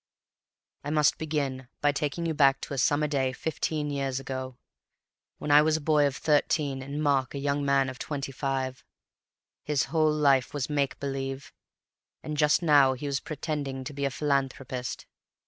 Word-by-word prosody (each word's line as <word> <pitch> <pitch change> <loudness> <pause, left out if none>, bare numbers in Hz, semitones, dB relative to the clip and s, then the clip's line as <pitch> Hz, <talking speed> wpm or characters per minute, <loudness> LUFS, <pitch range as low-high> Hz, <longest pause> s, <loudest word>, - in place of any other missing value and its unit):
"I 145 - -4
must 150 -1 +3
begin 140 -5 -2
by 145 - +3
taking 150 +4 -2
you 165 - 0
back 140 -2 +4
to - - -6
a 135 - -2
summer 145 +3 +2
day 135 -3 0
fifteen 155 0 -2
years 135 -2 -2
ago, 130 -1 -6 0.8
when 145 - -3
I 145 +1 +8
was 155 +1 +2
a - - -5
boy 150 -1 +3
of 135 - -3
thirteen 145 -2 +1
and 140 +3 -4
Mark 140 -3 +1
a - - -2
young 140 +1 -1
man 140 -1 +3
of 130 -1 -7
twenty 140 -2 -4
five. 130 -1 -3 0.8
His 150 -3 +1
whole 155 -1 +4
life 140 -3 +2
was 145 +1 -2
make 140 -2 0
believe, 135 -1 -4 0.7
and 150 - -4
just 150 +3 +3
now 145 -4 +5
he 130 +3 -7
was 140 -1 -1
pretending 145 -3 -4
to 145 - -7
be 140 0 -2
a - - +1
philanthropist. 135 -3 -2
140 Hz, 175 wpm, -28 LUFS, 135-150 Hz, 0.8 s, I